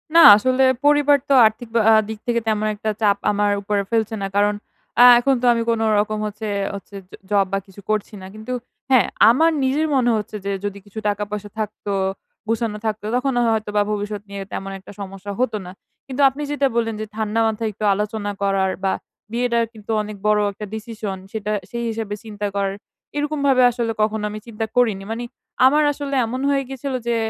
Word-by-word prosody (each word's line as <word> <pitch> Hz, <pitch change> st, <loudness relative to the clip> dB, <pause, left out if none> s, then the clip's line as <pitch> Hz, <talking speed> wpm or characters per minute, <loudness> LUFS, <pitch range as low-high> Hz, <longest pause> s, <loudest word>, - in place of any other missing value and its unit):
না, 335 Hz, -, +9 dB, 0.2 s
আসলে 255 Hz, +4 st, +2 dB, 0.2 s
পরিবার 290 Hz, -1 st, +5 dB
তো -, -, +5 dB
আর্থিক 220 Hz, +2 st, 0 dB
বা 230 Hz, -, +5 dB
আ -, -, +7 dB, 0.2 s
দিক 220 Hz, -1 st, -5 dB
থেকে 235 Hz, -1 st, +2 dB
তেমন 215 Hz, -1 st, +1 dB
একটা 215 Hz, +1 st, -3 dB
চাপ 200 Hz, -2 st, +3 dB
আমার 205 Hz, 0 st, +1 dB
উপরে 200 Hz, 0 st, 0 dB
ফেলছে 225 Hz, -1 st, 0 dB
না। 195 Hz, -, -1 dB
কারণ, 205 Hz, +1 st, +3 dB, 0.5 s
আ -, -, +10 dB, 0.2 s
এখন 270 Hz, +2 st, +2 dB
তো -, -, 0 dB
আমি 230 Hz, -, -1 dB
কোনোরকম 215 Hz, -2 st, +1 dB
হচ্ছে 210 Hz, +1 st, -5 dB, 0.3 s
হচ্ছে 200 Hz, 0 st, -10 dB
জ -, -, -41 dB, 0.2 s
জব 200 Hz, -1 st, +4 dB
বা 195 Hz, -, +3 dB
কিছু 195 Hz, +1 st, -14 dB
করছি 215 Hz, 0 st, -1 dB
না। -, -, -9 dB
কিন্তু 215 Hz, +3 st, -8 dB, 0.4 s
হ্যাঁ, 255 Hz, -, +5 dB, 0.2 s
আমার 320 Hz, +7 st, +4 dB
নিজের 290 Hz, +4 st, +1 dB
মনে 245 Hz, -2 st, +3 dB
হচ্ছে 210 Hz, 0 st, -5 dB
যে 200 Hz, -, -1 dB
যদি 200 Hz, -1 st, -3 dB
কিছু 205 Hz, +2 st, -8 dB
টাকা-পয়সা 205 Hz, 0 st, -4 dB
থাকত, 215 Hz, 0 st, -5 dB, 0.6 s
গোছানো 225 Hz, -1 st, -1 dB
থাকত, 215 Hz, -1 st, -1 dB
তখন 265 Hz, +1 st, 0 dB
ও -, -, +3 dB
হয়তোবা 210 Hz, -2 st, 0 dB
ভবিষ্যৎ 205 Hz, 0 st, -3 dB
নিয়ে 200 Hz, 0 st, -6 dB
তেমন 195 Hz, 0 st, -5 dB
একটা 190 Hz, -, -13 dB
সমস্যা 195 Hz, +1 st, -7 dB
হত 255 Hz, -2 st, +1 dB
না। 180 Hz, -, -8 dB, 0.4 s
কিন্তু 265 Hz, +1 st, -3 dB
আপনি 280 Hz, +3 st, -8 dB
যেটা 285 Hz, -1 st, +2 dB
বললেন 225 Hz, -2 st, 0 dB
যে 215 Hz, -, -3 dB
ঠান্ডা 220 Hz, 0 st, -1 dB
মাথায় 220 Hz, 0 st, -1 dB
একটু 210 Hz, -, -9 dB
আলোচনা 210 Hz, 0 st, -2 dB
করার 195 Hz, -1 st, +1 dB
বা, 190 Hz, -, +2 dB, 0.4 s
বিয়েটা 235 Hz, 0 st, +1 dB
কিন্তু 215 Hz, 0 st, -8 dB
অনেক 210 Hz, -1 st, -7 dB
বড় 210 Hz, 0 st, +4 dB
একটা 205 Hz, +2 st, -8 dB
decision 215 Hz, -3 st, -5 dB
সেটা 210 Hz, -1 st, -3 dB, 0.2 s
সেই 235 Hz, 0 st, -4 dB
হিসাবে 220 Hz, -2 st, -3 dB
চিন্তা 210 Hz, -2 st, -4 dB
করার। 195 Hz, 0 st, -1 dB, 0.4 s
এরকমভাবে 285 Hz, -3 st, +2 dB
আসলে 230 Hz, -1 st, -2 dB
কখনো 215 Hz, 0 st, 0 dB
আমি 215 Hz, -, -6 dB
চিন্তা 225 Hz, 0 st, -3 dB
করিনি। 220 Hz, -6 st, +2 dB
মানে 235 Hz, +2 st, -3 dB, 0.4 s
আমার 295 Hz, +3 st, +5 dB
আসলে 280 Hz, -1 st, -4 dB
এমন 255 Hz, +3 st, -4 dB
হয়ে 275 Hz, -1 st, +1 dB
গেছিলো 270 Hz, 0 st, -3 dB
যে 235 Hz, -, +2 dB
220 Hz, 195 wpm, -21 LUFS, 205-240 Hz, 0.6 s, আ